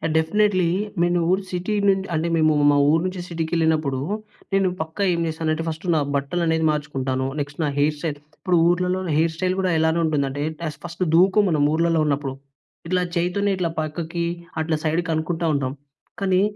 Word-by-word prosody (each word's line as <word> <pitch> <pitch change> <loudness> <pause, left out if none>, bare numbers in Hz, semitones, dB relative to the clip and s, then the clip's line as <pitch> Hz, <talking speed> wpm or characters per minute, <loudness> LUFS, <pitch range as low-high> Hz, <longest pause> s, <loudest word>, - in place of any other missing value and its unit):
Definitely. 185 +2 +2 0.3
నేను 175 0 +2
ఊరు 190 +1 +1
city 180 +4 -2
నుం 195 -1 +4
అంటే 160 +1 0
మేము 155 -1 +4 0.2
మా 145 - +3
ఊరు 160 +1 +3
నుంచి 185 -1 -3
సిటీకెళ్ళినప్పుడు 160 -4 0 0.5
నేను 195 -1 +3
పక్కా 160 +5 -3
ఏం 170 - -1
చేస్తానంటే 160 0 -1
ఫస్ట్ 160 +2 -5
నా 155 - +3 0.2
బట్టలనేవి 160 +3 0
మార్చుకుంటాను. 135 -3 -2
నెక్స్ట్ 145 +1 -5
నా 150 - +1
హెయిర్ 150 +2 +2
స్టైల్ 150 -3 -3 0.2
ఇప్పుడు 180 -2 +1
ఊర్లలో 180 +1 +1 0.2
హెయిర్ 160 0 +2
స్టైల్ 185 +2 0
గూడా 185 -1 +1
ఎలానుంటుందంటే 155 -4 +1 0.2
టెస్ 150 -3 -4
ఫస్ట్ 170 +2 -3
దువ్వుకోము 190 +4 +5
మనం 150 -3 +2
ఊర్లలో 165 0 +2
ఉన్నప్పుడు. 140 -2 -1 0.5
ఇట్లా 185 +1 +1
చేయితోనే 180 +4 +1
ఇట్లా 175 -2 0
పక్కకి 165 +2 -3 0.4
అట్లా 160 0 0
సైడ్ 160 +2 +1
కనుకుంటా 160 +2 -1
ఉంటాం. 135 -2 -1 0.5
కానీ 190 -1 +2
165 Hz, 160 wpm, -23 LUFS, 155-180 Hz, 0.5 s, దువ్వుకోము